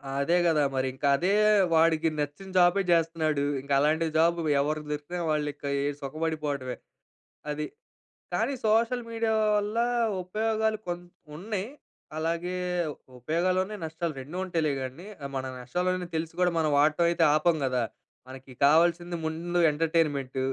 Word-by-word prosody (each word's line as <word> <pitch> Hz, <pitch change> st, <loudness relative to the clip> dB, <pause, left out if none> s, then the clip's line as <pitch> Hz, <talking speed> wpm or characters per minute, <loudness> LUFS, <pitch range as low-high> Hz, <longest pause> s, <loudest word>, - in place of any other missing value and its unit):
ఆదే 140 Hz, +5 st, +2 dB
కదా! 155 Hz, -3 st, +3 dB
మరి 130 Hz, 0 st, 0 dB
ఇంక 130 Hz, -, -19 dB
అదే 180 Hz, +7 st, +1 dB, 0.4 s
వాడికి 160 Hz, 0 st, +4 dB
నచ్చిన 150 Hz, +7 st, -4 dB
జాబే 180 Hz, +2 st, +5 dB
చేస్తన్నాడు. 160 Hz, -3 st, +1 dB, 0.2 s
ఇంకా 140 Hz, +1 st, -3 dB
అలాంటి 155 Hz, +3 st, +2 dB
జాబు 170 Hz, +1 st, +3 dB, 0.2 s
ఎవరికి 150 Hz, +1 st, -2 dB
దొరికినా 150 Hz, +4 st, -4 dB
వాళ్ళు 150 Hz, -1 st, 0 dB
ఇకే 145 Hz, 0 st, -6 dB, 0.3 s
సుఖపడిపోవడమే, 145 Hz, -3 st, -3 dB, 0.8 s
అది. 150 Hz, 0 st, -3 dB, 0.7 s
కానీ 225 Hz, +9 st, 0 dB
సోషల్ 230 Hz, +3 st, +2 dB
మీడియా 225 Hz, -1 st, 0 dB, 0.2 s
వల్ల 210 Hz, +2 st, -2 dB, 0.5 s
ఉపయోగాలు 220 Hz, +3 st, 0 dB
కొన్ని 175 Hz, 0 st, -4 dB, 0.3 s
ఉన్నాయి. 205 Hz, +2 st, -4 dB, 0.5 s
అలాగే 170 Hz, +3 st, -2 dB, 0.6 s
ఉపయోగాలున్నాయి, 185 Hz, -, 0 dB
నష్టాలు 160 Hz, +1 st, -3 dB
2 150 Hz, +7 st, -8 dB
ఉంటాయిలే 165 Hz, -5 st, 0 dB
కానీ, 135 Hz, +9 st, -8 dB, 0.3 s
మన 130 Hz, -, -2 dB, 0.2 s
నష్టాలున్నాయని 180 Hz, +8 st, -2 dB
తెలిసి 160 Hz, 0 st, -3 dB
కూడా 180 Hz, -1 st, +4 dB
మనం 155 Hz, -2 st, +1 dB
వాడటం 155 Hz, +4 st, +3 dB
అయితే 170 Hz, -, +2 dB
ఆపం 160 Hz, +2 st, +2 dB
గదా. 125 Hz, -2 st, 0 dB, 0.5 s
మనకి 130 Hz, 0 st, -11 dB
కావాల్సింది 170 Hz, +3 st, +3 dB
ముందు 170 Hz, +2 st, -2 dB
ఎంటర్టైన్మెంట్ 150 Hz, -4 st, 0 dB
165 Hz, 130 wpm, -27 LUFS, 150-180 Hz, 0.8 s, జాబే